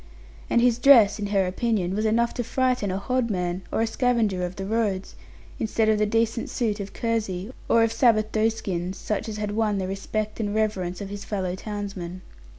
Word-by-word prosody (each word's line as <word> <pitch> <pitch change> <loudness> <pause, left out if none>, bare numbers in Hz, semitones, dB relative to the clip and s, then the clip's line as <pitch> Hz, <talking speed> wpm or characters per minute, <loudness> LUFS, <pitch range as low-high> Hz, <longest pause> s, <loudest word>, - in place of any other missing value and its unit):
And 235 - +3
his 240 -1 +3
dress, 245 -7 +6
in 205 - -2
her 200 -2 +2
opinion, 190 -1 0
was 215 +1 0
enough 235 +2 +2
to 245 - -2
frighten 250 -3 0
a 185 - -1
hodman, 195 -6 -1
of - - 0
a - - +3
scavenger 225 -5 +1
of 180 +1 -4
the 195 - -5
roads, 205 -3 -1 0.5
instead 220 0 +1
of 215 -1 +3
the 210 - +2
decent 230 +2 0
suit 220 -4 -1
of 200 0 -5
kersey, 220 -3 -2 0.2
or 230 - +5
of 225 0 +1
Sabbath 220 -3 +3
doeskins, 195 -5 -1
such 215 +2 -3
as 215 - -5
had 210 -1 -2
won 210 -1 +1
the 190 - -1
respect 210 +3 -3
and 205 -1 -2
reverence 190 -5 -1
of 200 - -5
his 205 0 -6
fellow 190 -4 -2
townsmen. 190 -3 -6
215 Hz, 195 wpm, -25 LUFS, 195-225 Hz, 0.5 s, dress